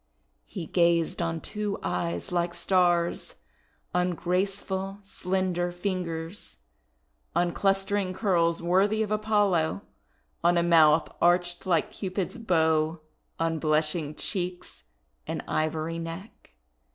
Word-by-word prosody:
He 180 -5 -6
gazed 170 0 +2
on 165 -1 -2
two 210 -1 -3
eyes 85 - -2
like 175 -1 0
Stars, 175 -1 +1 0.6
on 180 0 +1
graceful 190 +2 -1
slender 185 -2 -1
fingers, 175 - -4 0.8
on 175 0 +2
clustering 195 0 +1
curls 170 -4 +1
worthy 200 +5 +3
of 210 - -5
Apollo, 205 - +1 0.6
on 175 +1 +4
a 170 - +3
mouth 160 -2 +5
arched 175 +1 +2
like 170 -4 +2
Cupid's 190 +3 -3
bow, 160 -5 +2 0.4
on 165 -1 0
blushing 155 0 0
cheeks 180 -1 -4 0.5
and - - -3
ivory 155 +1 -1
neck. 165 +5 -8
175 Hz, 105 wpm, -27 LUFS, 165-190 Hz, 0.8 s, mouth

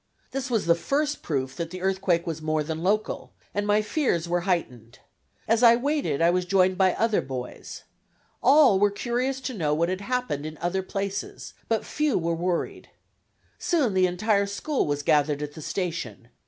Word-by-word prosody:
This 265 -1 -3
was 225 -7 0
the 170 - +5
first 290 - -1
proof 135 -4 -2
that 165 +2 -4
the 185 +1 -7
earthquake 190 -3 +1
was 160 -2 -4
more 155 0 0
than 160 +1 -4
local, 210 +4 -1 0.2
and 205 0 -1
my 210 +1 +3
fears 210 - 0
were 175 +1 0
heightened. 125 -10 -2 0.5
As 225 +1 +3
I 235 -1 +8
waited 275 - 0
I 170 - +5
was 180 0 0
joined 185 0 +3
by 185 -1 +3
other 225 -2 +2
boys. 125 -2 -7 0.6
All 275 -8 +6
were 205 +1 +4
curious 245 +5 -2
to 260 - -4
know 155 -8 0
what 170 +2 +1
had 185 +1 -2
happened 245 - -2
in 155 0 -6
other 175 +4 -1
places, 195 +1 -5
but 225 -2 0
few 300 -5 0
were 170 -1 0
worried. 175 +1 -2 0.7
Soon 285 - +1
the 185 -1 +4
entire 200 +3 +1
school 260 - -1
was 145 0 -1
gathered 150 0 +2
at 145 0 -6
the 155 - -9
station. 160 - -4
185 Hz, 180 wpm, -26 LUFS, 160-225 Hz, 0.7 s, I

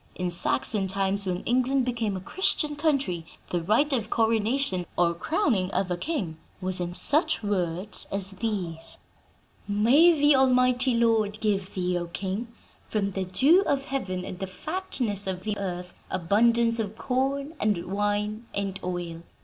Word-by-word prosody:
In 180 -1 -2
Saxon 200 +2 +1
times, 195 +1 0
when 180 -1 -2
England 255 +2 +1
became 230 -5 -1
a - - -7
Christian 300 - 0
country, 275 - 0 0.3
the 175 - 0
rite 225 - +2
of 225 -4 0
coronation, 225 -4 +1
or 170 -1 +3
crowning 200 - 0
of 185 -2 0
a - - +1
king, 180 - -3 0.2
was 185 -1 -2
in 175 0 -3
such 310 - +3
words 185 -1 -1
as 195 -1 -1
these: 185 -6 -1 0.7
'May 240 +12 +5
the 290 0 +6
almighty 255 -1 +4
Lord 220 -3 +2
give 200 -3 -1
thee, 180 -1 0
O 175 - -5
king, 195 +6 -4 0.4
from 200 -2 -1
the 190 0 -3
dew 270 - +4
of 275 -1 +1
heaven 190 -10 -3
and 185 - -7
the 190 - -3
fatness 225 - -2
of 185 -1 -3
the 215 -1 -2
earth, 180 -2 -5 0.2
abundance 230 +6 +2
of 220 0 -3
corn 275 +3 -1
and 205 -5 0
wine 205 +3 -2
and 195 -1 -2
oil! 175 -2 -4
205 Hz, 155 wpm, -26 LUFS, 185-250 Hz, 0.7 s, the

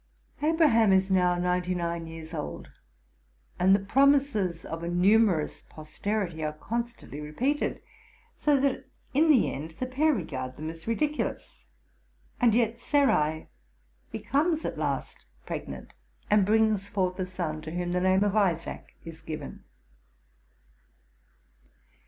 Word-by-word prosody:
Abraham 295 - +4
is 190 0 +3
now 180 -1 +3
ninety 180 +1 0
nine 170 -1 -3
years 160 -1 -9
old, 75 - -6 0.9
and 190 +2 +6
the 195 0 -2
promises 265 - +2
of 165 0 -5
a 170 - -3
numerous 185 -2 +3
posterity 165 +2 -3
are 150 0 -2
constantly 230 -3 -5
repeated: 255 - -1 0.5
so 290 -2 +2
that, 270 -1 0 0.3
in 310 +4 +4
the 270 -7 +4
end, 160 +3 -7
the 255 - -1
pair 280 +5 +2
regard 130 - -4
them 155 +3 -5
as 165 +3 -14
ridiculous. 300 +6 -2 0.7
And 235 -3 +4
yet 230 -1 +1
Sarai 160 - +1 0.6
becomes 295 +9 0
at - - -3
last - - -3 0.2
pregnant, - - -6 0.4
and 205 -2 +4
brings 215 -2 +2
fortii 185 -2 -1
a 185 - 0
son, 170 -4 -4
to 155 - -7
whom 175 +1 -2
the 180 0 0
name 190 +1 +3
of 205 0 0
Isaac 175 -6 -1
is 165 -1 -9
given. 155 -2 -7
190 Hz, 130 wpm, -28 LUFS, 165-235 Hz, 0.9 s, and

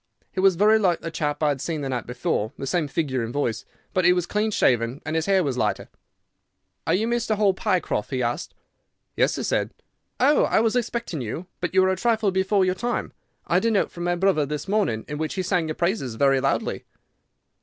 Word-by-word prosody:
He - - -5
was 190 -1 +5
very 215 +4 +5
like 180 -5 +1
the 165 - -5
chap 150 -1 -2
I 150 - +4
had 140 -3 -1
seen 160 -3 -3
the 135 - -3
night 125 -3 -3
before, 120 -3 -2
the - - -5
same 155 +2 0
figure 135 -3 -1
and 115 - -4
voice, 120 -5 -2 0.3
but 185 -2 +2
he 180 +1 +6
was 180 -1 0
clean 210 +3 0
shaven 125 - +1
and 155 - -2
his 160 +1 0
hair 190 -2 +3
was 130 -4 -2
lighter. - - -1 1.0
"'Are 165 - +3
you 215 +4 0
Mr. 235 -2 0
Hall 205 -2 +3
Pycroft?' 185 - -1
he 130 -2 -1
asked. 120 +7 -3 0.6
"'Yes,' - - +2
said - - 0 0.5
I. 270 +3 +5
"'Oh! 300 - +4
I - - +2
was 225 +1 +1
expecting 235 - -2
you, 125 +10 -5
but 180 +1 -3
you 190 - +6
are - - +2
a - - +1
trifle 220 0 +1
before 190 +1 +2
your 185 - +1
time. 240 +6 -3 0.3
I - - -3
had 190 - 0
a - - +4
note 210 -3 +1
from 175 - -7
my 175 0 +1
brother 180 -4 +2
this 150 +5 -4
morning 195 - 0
in 150 0 -5
which 155 0 -2
he 190 - -1
sang 180 -3 0
your 155 - -3
praises 170 - -1
very 135 +2 +3
loudly. 135 - -1
175 Hz, 230 wpm, -24 LUFS, 140-200 Hz, 1.0 s, he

